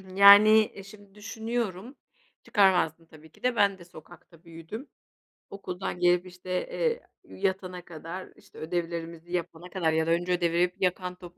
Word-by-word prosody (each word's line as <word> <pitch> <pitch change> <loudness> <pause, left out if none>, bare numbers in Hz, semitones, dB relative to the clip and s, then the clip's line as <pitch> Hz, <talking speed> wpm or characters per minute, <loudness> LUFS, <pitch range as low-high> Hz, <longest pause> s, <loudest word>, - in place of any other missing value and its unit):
Yani 210 +2 +8
şimdi 200 0 -16
düşünüyorum, 220 +1 -4 0.5
çıkarmazdım 180 -5 +2
tabii 160 -1 -17
ki - - -24
de. 250 -1 +1
Ben 200 -2 +3
de 175 - -14
sokakta 170 0 -16
büyüdüm; 165 - -9 0.6
okuldan 185 -2 -6
gelip, 180 0 +3
işte, 180 0 -13 0.2
eee, 480 0 -1 0.2
yatana 185 -2 -4
kadar, 170 +3 -8
işte - - -20
ödevlerimizi 170 0 -5
yapana 175 0 -4
kadar 170 -3 0
ya 160 0 +1
da - - +2
önce 175 +2 0
ödevleri 175 0 +1
Yakan 180 0 -1
top 175 -1 -13
180 Hz, 140 wpm, -27 LUFS, 170-200 Hz, 0.6 s, Yani